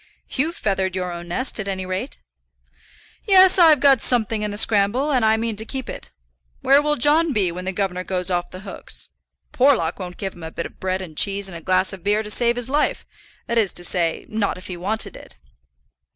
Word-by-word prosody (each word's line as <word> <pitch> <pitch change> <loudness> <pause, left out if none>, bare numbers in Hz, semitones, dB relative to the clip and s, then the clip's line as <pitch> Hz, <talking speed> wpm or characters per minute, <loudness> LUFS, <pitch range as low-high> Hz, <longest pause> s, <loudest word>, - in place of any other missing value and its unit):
"You've 320 +6 -1
feathered 190 -2 -1
your 180 -1 -3
own 175 0 -7
nest, 245 +8 -2
at 205 - -4
any 190 -1 -3
rate." 185 +8 -4 1.1
"Yes; 380 -2 +6
I've 320 -4 +7
got 275 -3 +5
something 225 -3 +1
in 210 - -2
the 205 - -5
scramble, 220 +7 +2
and 255 -4 +2
I 220 0 +4
mean 225 -1 -2
to 220 - +1
keep 260 +3 -6
it. - - -8 0.5
Where 275 +2 +5
will 295 0 +1
John 295 +4 +3
be 195 -6 +1
when 180 +2 -7
the 190 - -1
governor 185 -2 -2
goes 185 0 -1
off 175 -1 -1
the 185 - -9
hooks? 200 -1 -5 0.4
Porlock 245 - +2
wouldn't 180 -2 -7
give 195 -1 -4
him 175 - -14
a 160 - -6
bit 170 - -5
of - - -11
bread 185 0 -2
and 160 -4 -11
cheese 200 +3 +1
and 185 - -8
a 165 - -7
glass 185 +2 +1
of 190 - -10
beer 210 +2 +1
to 210 - -5
save 235 +1 +1
his 245 -1 -3
life; 290 +3 0 0.4
that 235 0 +1
is 205 -4 +2
to 175 - -4
say, 170 -2 -1
not 215 -3 -1
if 185 - -11
he 185 - -5
wanted 200 +6 -3
it." - - -13
205 Hz, 225 wpm, -21 LUFS, 185-245 Hz, 1.1 s, I've